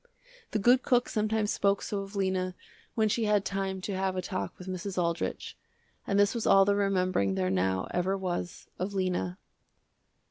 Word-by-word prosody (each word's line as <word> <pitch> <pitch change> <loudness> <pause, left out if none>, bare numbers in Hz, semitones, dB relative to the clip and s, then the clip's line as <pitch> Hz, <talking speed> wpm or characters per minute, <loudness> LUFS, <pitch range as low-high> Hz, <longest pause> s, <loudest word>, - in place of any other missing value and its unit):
The - - -1
good 245 +5 +5
cook 245 -1 +2
sometimes 215 0 0
spoke 200 0 +1
so 205 - -2
of 195 +1 -7
Lena 185 -2 0 0.4
when 220 -1 +3
she 220 +2 0
had 210 -2 +2
time 195 -1 -2
to 195 +1 -3
have 190 0 -1
a 185 - -1
talk 185 - -4
with 180 - -10
Mrs. 185 +1 -4
Aldrich, 170 -1 -2 0.5
and 200 0 +2
this 205 0 +4
was 235 -2 -2
all 195 0 +7
the 200 - +3
remembering 185 - +1
there 95 -1 0
now 95 0 0
ever 185 +2 0
was 175 -2 -4
of 195 +3 -3
Lena. 180 -1 -1
190 Hz, 180 wpm, -29 LUFS, 180-205 Hz, 0.5 s, all